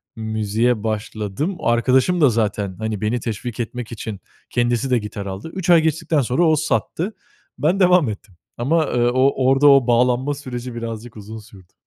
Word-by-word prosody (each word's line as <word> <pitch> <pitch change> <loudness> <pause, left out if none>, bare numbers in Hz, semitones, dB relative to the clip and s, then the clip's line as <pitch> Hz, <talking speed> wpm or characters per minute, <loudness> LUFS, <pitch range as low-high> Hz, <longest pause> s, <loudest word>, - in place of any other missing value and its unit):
müziğe 110 +1 -1
başladım. 110 - -3
Arkadaşım 130 +9 +2
da 145 - +6
zaten, 105 -4 -1
hani, 110 -2 -3
beni 115 +3 0
teşvik 115 +1 -5
etmek 120 0 -5
için 110 -3 -6 0.3
kendisi 120 +2 0
de 125 - +3
gitar 105 -1 -7
aldı. 100 +10 -6
3 185 -2 -4
ay 170 -2 +7
geçtikten 160 -1 0
sonra 125 +7 +1
o 160 -2 +4
sattı. 165 +5 -2 0.4
Ben 165 +8 +1
devam 180 -8 +4
ettim 100 -2 -9 0.2
ama, 155 +6 +1
ııı, 120 0 +1
o 130 0 +2
orda 135 +2 +4
o 135 -3 +6
bağlanma 125 +3 +2
süreci 125 -3 -7
birazcık 115 -1 -6
uzun 110 +2 -9
sürdü. 100 -4 -17
120 Hz, 165 wpm, -20 LUFS, 110-140 Hz, 0.4 s, ay